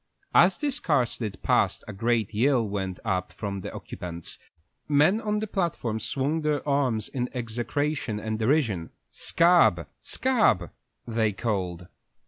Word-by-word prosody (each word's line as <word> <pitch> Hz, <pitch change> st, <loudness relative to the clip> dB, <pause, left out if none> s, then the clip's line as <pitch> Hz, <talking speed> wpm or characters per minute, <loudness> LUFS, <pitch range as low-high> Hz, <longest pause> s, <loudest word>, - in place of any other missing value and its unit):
As -, -, +6 dB
this 285 Hz, -3 st, -1 dB
car 145 Hz, -7 st, +2 dB
slid 110 Hz, -4 st, -6 dB
past -, -, +2 dB
a 105 Hz, -, -6 dB
great 115 Hz, +1 st, 0 dB
yell 120 Hz, +1 st, +2 dB
went 95 Hz, -2 st, -3 dB
up 95 Hz, -3 st, -1 dB
from 100 Hz, +1 st, -5 dB
the -, -, -6 dB
occupants; 85 Hz, -2 st, -7 dB, 0.5 s
men 150 Hz, +9 st, +4 dB
on 210 Hz, -1 st, -1 dB
the 215 Hz, -, -1 dB
platforms 170 Hz, -, -2 dB
swung 145 Hz, +4 st, -1 dB
their 150 Hz, -1 st, -1 dB
arms 130 Hz, -7 st, +1 dB
in 125 Hz, -2 st, -3 dB
execration 120 Hz, +1 st, -2 dB
and 110 Hz, 0 st, -3 dB
derision. 110 Hz, -, +1 dB, 0.2 s
"Sc -, -, -1 dB
ab, 175 Hz, +1 st, +5 dB
sc -, -, -7 dB
ab!" 220 Hz, -, +3 dB, 0.3 s
they 110 Hz, -2 st, 0 dB
called. 90 Hz, -5 st, -3 dB
115 Hz, 145 wpm, -26 LUFS, 100-150 Hz, 0.5 s, As